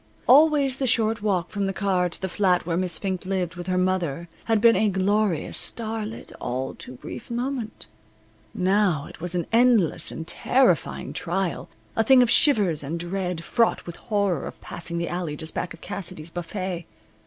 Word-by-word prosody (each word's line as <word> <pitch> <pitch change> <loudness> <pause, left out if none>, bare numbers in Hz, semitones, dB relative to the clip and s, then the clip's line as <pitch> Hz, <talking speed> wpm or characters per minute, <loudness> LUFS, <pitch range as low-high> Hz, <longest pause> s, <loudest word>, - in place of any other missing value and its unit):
Always 280 -1 +5
the 265 - 0
short 225 -2 +1
walk 190 -5 0
from 200 -2 -1
the 195 - -2
car 185 -3 +1
to - - -5
the 190 - -2
flat 185 -2 +1
where 165 -1 -1
Miss 180 -1 0
Fink 190 -2 -3
lived 185 -2 -2
with 175 0 -7
her 185 0 0
mother 175 -3 -1 0.2
had 225 -1 +2
been 230 +1 +6
a 215 - +3
glorious, 195 -2 0
star 220 -2 -2
lit, 225 - -9
all 130 +2 -3
too - - -10
brief 125 - -9
moment. 240 -1 -4 0.7
Now 190 -6 +1
it - - -13
was 175 +1 -4
an 170 -2 0
endless 230 -7 +3
and 160 - -6
terrifying 245 - +1
trial, 180 +1 -2 0.3
a 225 - +3
thing 255 +2 +7
of 240 - +1
shivers 205 - +4
and 160 +5 -4
dread, 180 -1 -3
fraught 230 +5 +1
with 170 - -8
horror 200 - -1
of - - -9
passing 170 0 -5
the 170 0 -1
alley 175 -4 -3
just 160 +2 -6
back 180 - -3
of 170 - -11
Cassidey's 180 -4 -4
buffet. 175 0 -4
185 Hz, 185 wpm, -25 LUFS, 170-220 Hz, 0.7 s, thing